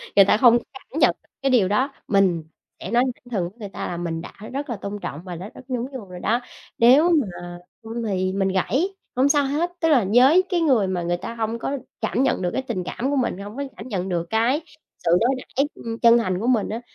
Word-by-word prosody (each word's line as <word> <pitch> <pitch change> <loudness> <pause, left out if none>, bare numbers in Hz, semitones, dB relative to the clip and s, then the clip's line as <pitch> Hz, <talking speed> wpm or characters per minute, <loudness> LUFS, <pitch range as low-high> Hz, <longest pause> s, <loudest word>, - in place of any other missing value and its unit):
người 195 - +8
ta 205 - +4
hông 240 0 +6 0.2
cảm 270 +3 -7
nhận - - +4
được - - -33
cái 275 - +1
điều 230 -7 +4
đó, 255 +8 +1
mình 190 -5 +2 0.4
sẽ 185 - -6
nói 240 +1 +4
thẳng 245 - -20
thừng 180 -6 -1
với 225 +5 -27
người 205 - -6
ta - - -5
là 175 - -4
mình 165 -1 -3
đã - - -10 0.2
rất 280 +1 -4
là 235 - -2
tôn 200 +1 -6
trọng 150 -3 -6
và 180 -2 -6
đã 190 +5 -7
rất 255 - -13
nhún 250 -1 -1
nhường 225 -9 -8
rồi 180 - -8
đó. 230 +6 +1 0.4
Nếu 270 +9 +6
mà 175 - -1 0.3
không 230 +1 -5
thì 185 -1 0
mình 195 -1 +1
gãy 225 - +1 0.3
hông 260 +3 +3
sao 285 -1 +3
hết, 315 +6 -1
tức 325 - +2
là 260 -9 +4
với 270 +10 +6
cái 350 -3 +1
người 250 -11 +3
mà 180 -2 -2
người 175 +1 0
ta 230 +6 -7
hông 225 +1 -2
có 280 - -2 0.2
cảm 230 +3 +1
nhận 265 - +1
được 180 - 0
cái 265 - 0
tình 230 -8 -3
cảm 260 +9 -3
của 285 - 0
mình, 250 -8 0
hông 205 +2 -8
có 280 - -2
cảm 225 - -8
nhận 190 -4 -3
được 170 -1 -1
cái 235 +8 +2 0.4
sự 165 - +2
đối 235 - +2
đãi, 275 +2 -1
ưm, 230 0 -6
chân 235 0 +6
thành 185 -6 0
của 230 - -2
mình 235 -5 +2
á, 225 +2 -4
225 Hz, 260 wpm, -23 LUFS, 190-260 Hz, 0.4 s, người